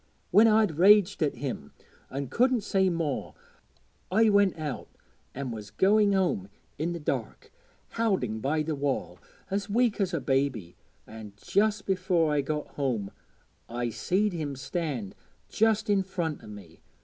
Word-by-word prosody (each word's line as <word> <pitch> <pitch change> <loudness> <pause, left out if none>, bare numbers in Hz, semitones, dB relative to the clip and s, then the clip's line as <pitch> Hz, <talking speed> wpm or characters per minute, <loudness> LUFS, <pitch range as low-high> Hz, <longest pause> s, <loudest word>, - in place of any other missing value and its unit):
When 220 +2 +7
I'd 215 -8 +3
raged 200 0 +5
at 150 -3 +1
him 120 - -5 0.4
an' 135 -1 -4
couldn't 250 -1 +2
say 190 -2 +2
more, 165 -6 -3 0.8
I 220 +2 +4
went 200 -3 +3
out 150 -5 -5 0.5
an' 135 -2 -4
was 105 -2 -7
going 205 +1 +3
home 175 - 0 0.3
i' 155 - -1
the 170 0 -2
dark, 150 - -4 0.5
howding 185 - 0
by 155 +4 0
the 155 +1 -2
wall, 140 -11 -2 0.3
as 200 +1 -2
weak 230 0 +2
as 190 -2 0
a 165 - -1
baby; 130 -9 -1 0.3
an' 110 -2 -10
just 205 - 0
afore 180 -5 +1
I 145 - +2
got 150 +2 -3
home, 120 -8 -2 0.6
I 120 0 -2
seed 195 - 0
him 150 -5 -3
stand 135 - -4 0.4
just 220 -1 +2
in 200 -2 +3
front' 175 -5 -4
o' - - -11
me. 100 -6 -12
160 Hz, 150 wpm, -28 LUFS, 130-200 Hz, 0.8 s, When